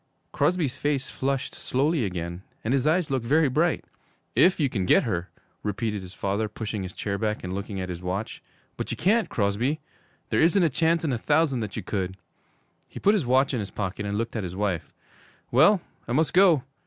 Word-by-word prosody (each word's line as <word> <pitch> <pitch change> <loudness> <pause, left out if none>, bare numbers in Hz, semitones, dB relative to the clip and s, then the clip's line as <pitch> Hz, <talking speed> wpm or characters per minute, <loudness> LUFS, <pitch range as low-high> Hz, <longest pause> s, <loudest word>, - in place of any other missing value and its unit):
Crosby's 150 -2 +1
face 145 -2 -1
flushed 135 0 -2
slowly 140 0 0
again, 85 -1 -4 0.2
and 115 - 0
his 135 +1 +2
eyes 160 -1 +2
looked 130 -3 0
very 150 +6 +3
bright. 160 +6 +1 0.5
'If 180 -1 +5
you 145 - +3
can 100 -8 -2
get - - +5
her,' 90 -6 -2 0.3
repeated 105 0 -2
his 90 0 -10
father, 100 +2 -1
pushing 110 -1 -4
his 90 -1 -6
chair 100 -1 -3
back 105 0 -1
and 90 0 -4
looking 100 0 -4
at 90 0 -4
his 90 -1 -5
watch; 95 +4 -4 0.4
'but - - -4
you - - -3
can't, 220 +4 +2
Crosby. 115 +9 0 0.5
There - - +3
isn't 175 +4 +4
a 165 - +4
chance 165 +3 +2
in 145 -5 0
a 120 - -1
thousand 145 -1 +2
that 105 -3 -4
you - - -4
could.' 95 -2 -3 0.7
He - - -9
put 205 - +4
his 185 - 0
watch 130 +2 +3
in 125 - 0
his 100 -2 -4
pocket 100 +1 -4
and 100 0 -2
looked 115 +2 -3
at 110 - -2
his 90 0 -5
wife. 95 -5 -2 0.6
'Well, 165 - +5 0.3
I 120 - -2
must 155 +4 +2
go. 175 -8 +5
120 Hz, 205 wpm, -26 LUFS, 100-150 Hz, 0.7 s, If